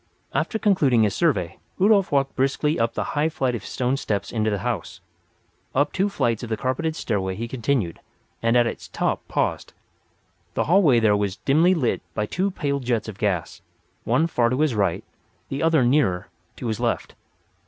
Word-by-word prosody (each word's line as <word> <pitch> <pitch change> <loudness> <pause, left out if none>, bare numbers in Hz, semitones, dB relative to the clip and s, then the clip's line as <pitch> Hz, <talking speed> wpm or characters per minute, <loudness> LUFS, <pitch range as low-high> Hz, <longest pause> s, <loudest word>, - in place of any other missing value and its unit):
After 220 - 0
concluding 150 - +3
his 105 - +1
survey 115 - 0 0.2
Rudolf 200 0 +4
walked 135 -1 +1
briskly 140 +3 +1
up 115 0 0
the - - -1
high 150 +2 +1
flight 135 -6 -1
of 115 -5 -4
stone 125 +5 -1
steps 100 -7 -2
into 110 -2 0
the 105 - 0
house. 115 -8 -3 0.8
Up 145 +2 +2
two 195 +2 +1
flights 115 - 0
of 120 - -6
the 110 - -1
carpeted 130 +8 -1
stairway 95 -9 -2
he 115 +3 -4
continued; 120 -7 -1 0.4
and 115 +1 +3
at 120 - +4
its 115 - -5
top - - -1
paused. - - -2 0.8
The - - +2
hallway 160 -8 +4
there 110 -2 +4
was 100 -2 -1
dimly 165 +7 +3
lighted 130 -8 0
by 105 - 0
two 185 - -1
pale 140 -6 -2
jets 120 -4 -1
of 100 -3 -8
gas—one 100 - -2
far 120 -8 +1
to 130 +4 0
his 155 -5 +2
right, 100 -6 0 0.5
the 135 - -3
other 160 -4 +3
nearer, 120 -9 +2 0.3
to - - -8
his 110 -2 -2
left. - - -1
125 Hz, 180 wpm, -23 LUFS, 110-150 Hz, 0.8 s, Rudolf